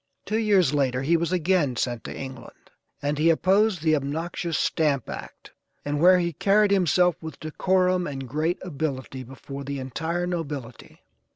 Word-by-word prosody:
Two 215 +2 0
years 195 - +3
later 130 -3 +1
he 165 +5 +3
was 170 +1 0
again 175 -6 +1
sent 120 -1 -2
to - - -6
England, 130 -2 -10 0.3
and 145 +1 -1
he 160 +2 +4
opposed 190 +2 +3
the 155 -1 +4
obnoxious 160 +4 -2
stamp 145 -6 +1
act, - - -9 0.3
and 145 0 -1
where 185 +2 +7
he 170 -1 -1
carried 205 +5 +3
himself 180 -2 +3
with 160 -1 -8
decorum 180 +3 +1
and 135 -2 -5
great 155 +6 -1
ability 140 -6 -4
before 135 +2 -8
the 140 +1 -4
entire 160 +7 -3
nobility. 145 -9 -6
160 Hz, 160 wpm, -25 LUFS, 140-180 Hz, 0.3 s, where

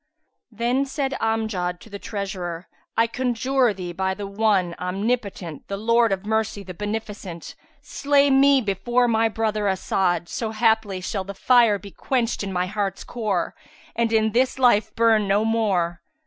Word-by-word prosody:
Then 240 +5 0
said 270 -1 -2
Amjad 215 -6 -1
to - - -14
the 200 - -6
treasurer, 190 -5 -5 0.3
"I 230 - +5
conjure 255 0 +1
thee 180 -3 -6
by 190 +2 -1
the 205 +1 -6
One, 200 -3 +1
Omnipotent, 195 - -3
the 200 - -4
Lord 230 +1 +3
of 195 +1 -2
Mercy, 220 -2 -1
the 185 -1 -8
Beneficent! 205 -3 -6 0.3
slay 285 -1 +2
me 275 0 +5
before 240 +4 +1
my 225 -1 +2
brother 215 -1 -1
As'ad, 185 -2 0
so 220 +3 -4
haply 220 -4 +1
shall 195 +1 -3
the 200 +1 -8
fire 235 -1 +4
be 200 +1 -11
quencht 240 +1 -1
in 200 -1 -3
my 180 -1 0
heart's 195 0 -3
core 210 -7 -2 0.4
and 230 0 +1
in 220 -1 +2
this 255 +4 +1
life 220 -4 +3
burn 225 -3 +3
no 205 +2 +2
more." 190 -7 0
215 Hz, 160 wpm, -23 LUFS, 195-230 Hz, 0.4 s, I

